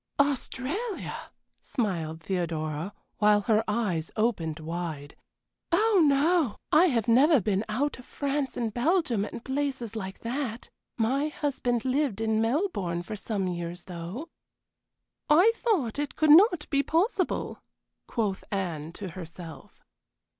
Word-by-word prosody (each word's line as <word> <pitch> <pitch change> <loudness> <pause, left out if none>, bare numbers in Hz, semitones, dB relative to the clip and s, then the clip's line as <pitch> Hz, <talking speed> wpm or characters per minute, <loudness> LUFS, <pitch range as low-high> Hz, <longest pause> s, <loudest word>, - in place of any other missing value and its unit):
"Australia!" 290 - -2 0.3
smiled 165 - -2
Theodora, 165 -2 -2 0.3
while 210 -1 +5
her 220 +1 +2
eyes 205 -7 -1
opened 180 -9 0
wide. 160 -3 -5 0.6
"Oh 420 +2 +4
no! 290 - +3 0.2
I 345 +4 +6
have 235 - 0
never 270 +6 +6
been 200 0 0
out 270 +6 -1
of 250 - -12
France 280 -1 -2
and 230 -3 -2
Belgium 250 - +1
and 220 +2 -7
places 265 -5 -2
like 190 -3 -6
that. 240 -1 -4 0.3
My 260 +6 +1
husband 260 -6 -1
lived 260 -5 0
in 220 0 +1
Melbourne 225 - 0
for 215 - -6
some 200 -2 -2
years, 175 0 -4
though." 185 - -7 1.0
"I 350 +9 +7
thought 320 - 0
it 290 - -3
could 310 -1 +4
not 355 -1 +6
be 280 -1 +3
possible," 360 +5 0 0.5
quoth 210 -5 -1
Anne 170 -5 -3
to 195 0 -6
herself. 170 -1 -10
230 Hz, 125 wpm, -28 LUFS, 185-290 Hz, 1.0 s, I